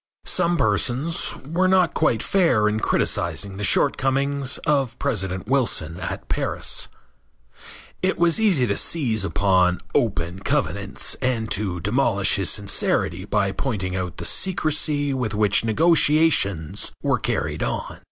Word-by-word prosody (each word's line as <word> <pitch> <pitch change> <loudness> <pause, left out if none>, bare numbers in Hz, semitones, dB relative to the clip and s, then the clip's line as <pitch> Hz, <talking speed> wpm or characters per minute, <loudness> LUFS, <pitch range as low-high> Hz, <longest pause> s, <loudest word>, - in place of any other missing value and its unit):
Some 170 0 +1
persons 120 - 0
were 175 +4 +1
not 185 -3 +3
quite 110 - +1
fair 165 - +2
in 105 +1 0
criticizing 100 -2 -1
the 105 - -5
shortcomings 135 +3 +1
of 140 -5 0
President 95 -8 -2
Wilson 110 - 0
at 85 - -6
Paris. - - 0 1.1
It 185 +1 0
was 170 +3 +2
easy 180 - +4
to 100 -3 -1
seize 120 - 0
upon 90 -1 +2
"open 90 -5 -1
covenants" - - -2
and 115 -4 -1
to 95 -3 -1
demolish 100 -1 +2
his 95 -2 0
sincerity 100 -2 -1
by 100 -1 0
pointing 95 -7 -3
out 90 -2 -4
the - - -6
secrecy 155 -5 0
with 120 -5 -2
which 105 0 +3
negotiations 150 - +2
were - - +1
carried - - -2
on. - - -4
115 Hz, 130 wpm, -22 LUFS, 100-145 Hz, 1.1 s, easy